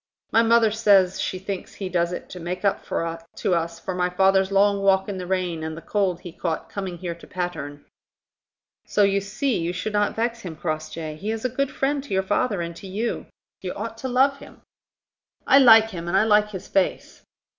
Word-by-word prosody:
My 225 - +5
mother 230 -1 +4
says 200 -4 +4
she 185 - -2
thinks 190 0 -6
he 195 - -4
does 175 -1 0
it 180 - -6
to 180 - -7
make 180 +3 -4
up 200 - +1 0.5
to - - 0
us 170 0 -1
for 190 - -4
my 180 0 0
father's 190 +1 +3
long 200 0 +3
walk 190 -1 +3
in 195 -2 -4
the 180 - -6
rain 180 -3 -1
and 160 0 -5
the - - -8
cold 190 -4 0
he 175 - -8
caught 165 -1 -4
coming 190 -3 -4
here 170 0 -4
to 170 - -15
Patterne." 160 -6 -5 1.0
"So 205 - +2
you 200 0 +3
see 215 +5 -1
you 170 +1 -1
should 185 +4 -4
not 205 0 +1
vex 235 +1 -1
him, 180 -7 -7
Crossjay. 155 -1 -4
He 205 +6 -5
is 225 +2 -3
a - - +2
good 275 +3 -1
friend 275 0 -1
to 275 - -3
your 190 - +2
father 205 0 0
and 170 0 -6
to 195 - -10
you. 215 +5 -3 0.3
You - - -4
ought - - -5
to 260 - -3
love 270 +2 +3
him." - - -14 0.8
"I 275 - +7
like 225 -4 +7
him, 170 -3 -6
and 180 +2 +2
I 195 - +5
like 210 -1 +4
his 190 -3 -8
face." 195 -2 -1
190 Hz, 215 wpm, -24 LUFS, 175-215 Hz, 1.0 s, I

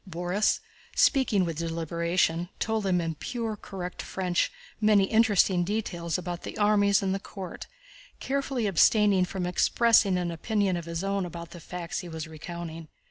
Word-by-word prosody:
Borís, 180 +4 +1 0.4
speaking 225 - +3
with 165 -2 -4
deliberation, 170 +1 0
told 220 -2 -1
them 185 -2 +2
in 165 -1 -2
pure, 225 - -4
correct 185 -3 -6
French 180 -2 -1 0.3
many 210 -2 +5
interesting 200 -4 +3
details 175 -5 -2
about 175 -1 -5
the - - -7
armies 205 -1 +3
and 190 -1 0
the 195 - -1
court, 190 -2 -8 0.5
carefully 270 -3 -1
abstaining 200 0 +4
from 180 0 -4
expressing 200 +2 +3
an 175 -1 -1
opinion 195 +3 0
of 170 -2 -4
his 170 +1 -4
own 195 0 0
about 170 -1 -7
the 175 - -9
facts 175 +1 -5
he 175 - -7
was 160 0 -5
recounting. 165 0 -7
180 Hz, 155 wpm, -27 LUFS, 170-205 Hz, 0.5 s, many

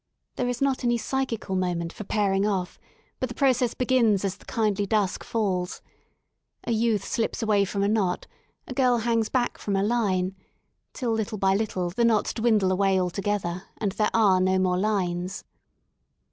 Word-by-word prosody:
There 250 - -1
is 245 +2 -1
not 270 -2 0
any 240 -1 +2
psychical 235 -5 -2
moment 175 -2 -1
for - - -7
pairing 195 -1 +1
offj 195 -3 -1 0.4
but 255 - -2
the 240 - -7
process 255 -3 +2
begins 235 -6 +2
as 190 -1 -1
the - - -19
kindly 210 -3 0
dusk 205 -2 0
falls, 190 -5 -1 0.8
A - - -3
youth 220 -3 +1
slips 230 0 -2
away 205 -2 +3
from 200 +1 -2
a - - +2
knot, 200 -4 0 0.4
a - - -5
girl 250 -2 +3
hangs 230 -1 0
back 245 -2 -1
from 200 - -2
a 195 - +1
line, 195 -5 0 0.6
till 245 -4 -2
little 220 0 -2
by 190 -1 +2
little 190 -4 -1
the 235 +7 0
knots 225 -2 +2
dwindle 220 -5 +2
away 190 0 +2
altogether 185 -1 -2
and 205 -3 -1
there 210 +2 +1
are 200 -5 +4
no 185 0 +2
more 180 -1 +1
lines. 185 -2 -1
210 Hz, 175 wpm, -26 LUFS, 190-230 Hz, 0.8 s, are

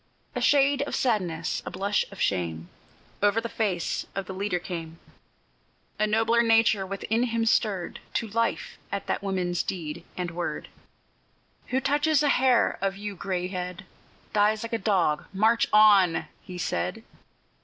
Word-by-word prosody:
A - - -3
shade 280 -1 +4
of - - -3
sadness, 180 -9 0
a - - -5
blush 200 +2 0
of 200 - -11
shame, 85 -3 -1 0.5
Over 205 +2 +3
the 225 - -7
face 200 -7 -2
of 195 0 -3
the 190 - -6
leader 190 -1 -1
came; 165 -2 -6 1.0
The 215 - +3
nobler 225 +2 +3
nature 225 -4 +3
within 205 +4 -1
him 230 -2 0
stirred 205 -5 0 0.2
To 230 - 0
life 230 +2 -2
at 200 - -3
that - - -2
woman's 185 -3 -1
deed 170 -2 -5
and 180 -2 -3
word; 175 +1 -4 1.0
"Who 260 - +1
touches 290 +2 +2
a 290 - +3
hair 255 -3 +3
of 195 0 -1
yon 205 0 -5
gray 180 -1 -2
head 180 0 -5 0.5
Dies 210 +1 +2
like 230 - -6
a 230 - 0
dog! 185 -7 +1
March 220 +4 +3
on!" 205 -5 +5 0.2
he 180 - -9
said. 90 - -2
200 Hz, 155 wpm, -26 LUFS, 180-225 Hz, 1.0 s, on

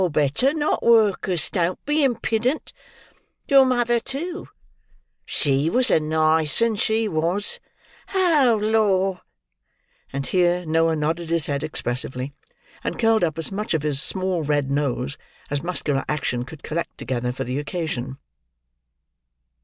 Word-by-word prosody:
Better 150 - +2
not! 300 0 0
Work'us, 205 -6 +2
don't 180 -1 -1
be 295 +1 +2
impudent. 240 +2 0 0.7
Your 275 -3 +7
mother, 240 -2 +2
too! 290 +9 -5 0.8
She 140 +2 +1
was 250 +5 +3
a - - +5
nice 155 0 +2
'un 230 -1 +2
she 220 +1 0
was. 175 +3 -1 0.6
Oh, 300 - +4
Lor!" 200 -4 +2 0.9
And 140 0 -3
here, 175 +3 +1
Noah 165 +1 +2
nodded 160 +2 -2
his 165 -2 +2
head 140 0 -2
expressively; 130 -2 -3 0.5
and - - -3
curled 225 -3 +3
up 160 -2 0
as 165 - -4
much 200 -3 -2
of 155 - -1
his 145 -2 -1
small 185 -1 0
red 145 -2 0
nose 140 -1 -1 0.3
as 145 -1 -1
muscular 150 -6 -2
action 125 -5 -1
could 150 +3 -12
collect 165 +2 -4
together, 125 0 -2
for 125 - -4
the 125 +3 -3
occasion. 145 -5 -4
170 Hz, 135 wpm, -23 LUFS, 145-220 Hz, 0.9 s, Your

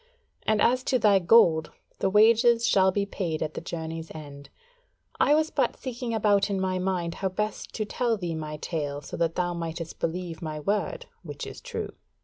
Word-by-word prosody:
And 215 -1 +3
as 255 +2 +3
to 260 - +2
thy 205 -4 +5
gold, 170 -5 +5 0.3
the 195 - +1
wages 230 +3 +5
shall 190 -4 +4
be 200 +1 0
paid 175 -6 -3
at 155 0 -4
the - - -5
journey's 165 -1 -5
end. 140 -2 -10 0.7
I 295 - +5
was 315 +1 +1
but - - 0
seeking 245 -2 -5
about 205 -2 +3
in 195 -1 -1
my 185 -1 0
mind 180 -2 -1
how 190 - +1
best 210 +3 -3
to 215 - -1
tell 230 +1 0
thee 175 -4 -3
my 155 -1 -5
tale 145 -3 -3
so - - -7
that 165 -1 0
thou 175 -1 0
mightest 165 -1 -5
believe 170 0 -3
my 155 -2 -4
word, 210 - -1 0.2
which - - -7
is - - -9
true. - - -5
185 Hz, 190 wpm, -27 LUFS, 165-220 Hz, 0.7 s, thy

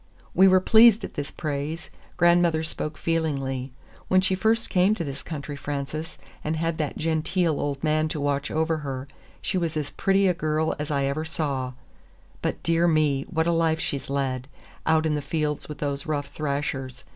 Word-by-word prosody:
We 190 +2 +7
were 185 0 +6
pleased 220 +3 +6
at - - -6
this 145 0 -4
praise. 155 +1 -4 0.3
Grandmother 175 -2 +4
spoke 155 -1 -3
feelingly. 135 -6 -1 0.4
"When 185 - +5
she 190 0 +1
first 220 +4 +2
came 185 +3 +4
to 175 - -3
this 140 -2 -5
country, 145 -2 -6
Frances, 145 +3 -4 0.3
and 155 +1 -1
had 165 0 -1
that 150 -2 -2
genteel 160 0 0
old 140 -1 -3
man 155 0 +2
to 155 - -4
watch 145 0 0
over 160 +1 +1
her, 135 -3 -5 0.4
she 185 - 0
was 165 -2 -1
as 145 -2 -3
pretty 195 0 +2
a 180 - +4
girl 155 -1 0
as 150 +1 -3
ever 140 +1 0
I - - -4
saw. 140 -5 -2 0.7
But, - - -2
dear 165 +1 +3
me, 150 -4 +2
what 160 -3 +1
a 170 - +2
life 165 -1 +2
she's 140 -4 -3
led, 135 -2 -1 0.4
out 160 0 +4
in 155 - +1
the 150 - -1
fields 150 +1 -2
with 150 - -6
those 140 0 -3
rough 145 -2 -2
thrashers! 140 -3 -3
155 Hz, 185 wpm, -25 LUFS, 140-165 Hz, 0.7 s, We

